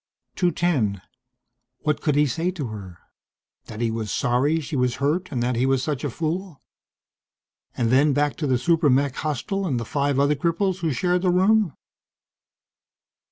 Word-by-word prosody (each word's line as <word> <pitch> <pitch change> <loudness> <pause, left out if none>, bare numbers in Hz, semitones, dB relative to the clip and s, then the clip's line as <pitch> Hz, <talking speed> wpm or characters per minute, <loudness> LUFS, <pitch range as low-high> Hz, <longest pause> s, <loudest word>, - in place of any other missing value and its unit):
210. 165 - +1 0.8
What 150 -1 0
could 150 -3 +1
he 150 +1 +4
say 165 +6 -1
to 155 -10 -4
her? 95 -5 -9 0.7
That 110 - -7
he 115 -1 +1
was 110 -2 -3
sorry 135 +7 +1
she 155 0 -5
was 125 -2 +1
hurt 155 +8 -1
and 125 -4 -1
that 125 0 0
he 125 +3 +1
was 135 -1 +1
such 150 -3 -2
a 145 - -1
fool? 165 +4 -4 1.2
And 115 -1 +1
then 140 +3 +4
back 145 +1 +1
to 150 - -2
the 130 -2 +2
super 165 +2 +2
mech 135 +1 +2
hostel 160 +6 -2
and 130 -7 0
the 115 - -4
five 140 +2 0
other 140 +1 +3
cripples 170 +5 0
who 165 -4 0
shared 180 +7 +1
the 185 - +2
room? 190 -1 +3
145 Hz, 170 wpm, -23 LUFS, 125-170 Hz, 1.2 s, he